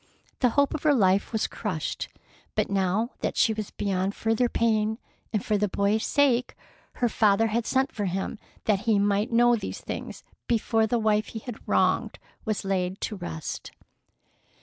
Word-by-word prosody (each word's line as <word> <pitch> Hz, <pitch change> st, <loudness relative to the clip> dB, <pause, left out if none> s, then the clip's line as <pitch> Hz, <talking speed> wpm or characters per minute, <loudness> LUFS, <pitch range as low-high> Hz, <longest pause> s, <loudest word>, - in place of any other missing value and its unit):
The 250 Hz, -, +4 dB
hope 285 Hz, 0 st, +4 dB
of 310 Hz, -, -3 dB
her 300 Hz, -2 st, +4 dB
life 195 Hz, -4 st, +3 dB
was 220 Hz, -2 st, 0 dB
crushed. 180 Hz, -8 st, -3 dB, 0.5 s
But -, -, 0 dB
now 195 Hz, +4 st, +1 dB
that -, -, -2 dB
she 225 Hz, -, +4 dB
was 215 Hz, -2 st, -4 dB
beyond 195 Hz, 0 st, -1 dB
further 225 Hz, +2 st, +1 dB
pain, 220 Hz, -2 st, +1 dB, 0.3 s
and 210 Hz, -3 st, -1 dB
for 210 Hz, -1 st, +1 dB
the 210 Hz, -, +2 dB
boy's 200 Hz, +3 st, +1 dB
sake, 255 Hz, -4 st, +2 dB, 0.4 s
her 245 Hz, -, +1 dB
father 215 Hz, -1 st, +3 dB
had 225 Hz, +1 st, -1 dB
sent 265 Hz, +1 st, +1 dB
for 205 Hz, -, -3 dB
him 190 Hz, +3 st, -3 dB, 0.3 s
that 210 Hz, -3 st, +3 dB
he 215 Hz, -, +5 dB
might 205 Hz, +3 st, +1 dB
know 240 Hz, +1 st, +5 dB
these 220 Hz, -, -5 dB
things -, -, -6 dB, 0.2 s
before 225 Hz, -1 st, +2 dB
the 240 Hz, -, +1 dB
wife 215 Hz, -1 st, +2 dB
he 220 Hz, -, -6 dB
had 245 Hz, -3 st, -8 dB
wronged -, -, +2 dB, 0.3 s
was 215 Hz, -3 st, -2 dB
laid 190 Hz, -1 st, -1 dB
to 215 Hz, -, -2 dB
rest. 165 Hz, -5 st, -5 dB
215 Hz, 170 wpm, -26 LUFS, 200-235 Hz, 0.5 s, he